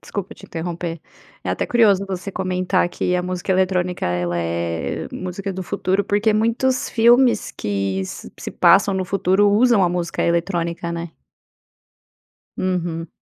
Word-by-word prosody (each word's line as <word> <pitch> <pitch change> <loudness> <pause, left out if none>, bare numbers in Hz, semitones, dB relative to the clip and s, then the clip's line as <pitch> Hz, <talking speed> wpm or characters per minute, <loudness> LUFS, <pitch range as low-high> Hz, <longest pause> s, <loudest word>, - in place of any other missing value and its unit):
desculpa 200 -2 -6
te - - -14
interromper, 170 0 -4 0.4
é - - -3
até - - -1
curioso 205 -5 +3
você 190 +1 -4
comentar 185 -1 0
que 180 +1 -1
a 180 - +1
música 180 +1 -2
eletrónica, 185 -1 0
ela 90 0 -1
é 85 0 -2
música 190 +2 -5
do 185 0 -5
futuro, 195 +1 0
porque 205 +2 +1
muitos 235 +5 +1
filmes 235 0 +4
que 100 -2 -2
se - - -8
passam 195 0 +4
no 190 0 -1
futuro 195 +2 +2
usam 225 0 +4
a - - +3
música 175 -1 -2
eletrónica, 170 0 -1
né? 170 -1 -5 1.4
Uhum. 175 -3 -2
185 Hz, 140 wpm, -21 LUFS, 170-200 Hz, 1.4 s, filmes